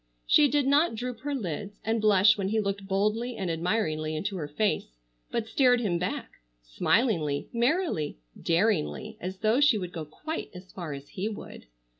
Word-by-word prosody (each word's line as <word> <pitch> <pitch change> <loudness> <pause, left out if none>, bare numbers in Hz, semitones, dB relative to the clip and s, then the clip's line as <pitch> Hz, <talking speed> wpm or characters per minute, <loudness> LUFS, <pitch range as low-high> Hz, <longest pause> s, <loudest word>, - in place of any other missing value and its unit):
She 300 -1 +6
did 285 0 +1
not 285 +1 +3
droop 245 0 -4
her 285 +2 -3
lids 200 - -5
and 225 0 +1
blush 210 0 +6
when 195 -2 -2
he 220 +2 +1
looked 200 -1 -2
boldly 215 +5 0
and 185 -4 -2
admiringly 160 -3 -1
into 195 +6 -2
her 150 -4 -4
face, 150 - -1 0.3
but 230 - -1
stared 245 +2 +4
him 185 -7 0
back, 180 - -4 0.2
smilingly, 150 - +1
merrily, 240 - 0 0.2
daringly, 205 +3 +1
as 185 +1 -4
though 220 +5 +3
she 290 -6 +5
would 180 -3 -4
go 160 -2 -5
quite 310 - -6
as 185 +1 -11
far 170 -5 -6
as 140 0 -9
he 200 +3 -3
would. 205 - -9
205 Hz, 175 wpm, -28 LUFS, 170-235 Hz, 0.3 s, She